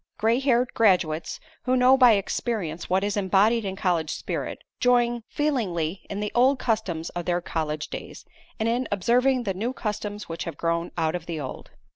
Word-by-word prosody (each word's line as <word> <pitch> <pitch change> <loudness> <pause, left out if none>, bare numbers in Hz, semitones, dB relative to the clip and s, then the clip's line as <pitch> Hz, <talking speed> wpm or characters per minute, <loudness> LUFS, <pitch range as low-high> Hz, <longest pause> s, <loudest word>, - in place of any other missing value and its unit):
Gray 225 +3 +2
haired 255 -2 +2
graduates 180 -7 +2 0.3
who 255 0 +2
know 255 +1 +6
by 250 -3 +7
experience 195 -5 -2
what 190 +2 +2
is 205 0 -1
embodied 205 +3 +3
in 190 -1 -3
college 175 -5 0
spirit, - - -4 0.2
join 240 -1 +3
feelingly 195 - -1
in 200 - -4
the 210 - -2
old 260 +3 +4
customs 200 -10 -2
of 175 -1 -5
their 175 0 +1
college 155 -3 -3
days, - - -8 0.3
and 220 - 0
in 240 +2 0
observing 245 +6 +2
the 195 -4 -1
new 225 +7 -2
customs 210 -3 -4
which 165 0 -5
have 165 -4 -6
grown 170 +1 -1
out 160 -1 +1
of 175 -2 -5
the 165 -2 -3
old. 130 -3 -7
205 Hz, 180 wpm, -25 LUFS, 170-240 Hz, 0.3 s, by